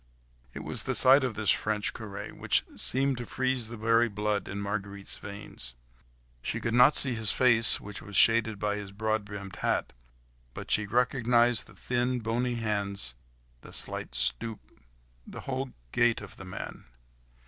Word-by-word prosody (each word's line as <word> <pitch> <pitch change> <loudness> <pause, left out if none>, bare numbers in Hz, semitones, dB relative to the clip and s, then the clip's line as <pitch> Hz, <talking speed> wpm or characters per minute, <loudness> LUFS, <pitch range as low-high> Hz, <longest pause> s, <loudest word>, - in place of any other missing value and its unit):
It - - -6
was - - -2
the - - -1
sight 135 +2 +6
of 125 -4 -2
this 110 -2 +2
French 105 -1 +1
curé, 105 -3 -8
which - - +1
seemed 135 -1 +2
to 120 - -6
freeze 130 -3 0
the 115 +1 -8
very 115 +2 +2
blood 105 0 -2
in 100 - -5
Marguerite's 100 -1 -5
veins. 100 - -5 0.7
She 110 - -3
could 115 0 -3
not 125 +5 +6
see 130 -3 +4
his 110 -3 0
face, 120 -3 +6
which 105 -1 -9
was 100 +1 -10
shaded 115 -2 +4
by 105 0 -2
his 100 -1 -7
broad 110 +1 -1
brimmed 100 -2 -9
hat, - - -1 0.6
but - - -7
she 105 -1 +1
recognised 120 0 +2
the - - -16
thin, 125 0 -1
bony 120 +2 -2
hands, 100 - -1 0.5
the - - -13
slight - - 0
stoop, 105 - +2 0.7
the - - -9
whole 135 0 -4 0.2
gait 120 -1 +2
of 100 -2 -11
the 95 - -10
man! 95 +2 -8
110 Hz, 165 wpm, -28 LUFS, 100-120 Hz, 0.7 s, sight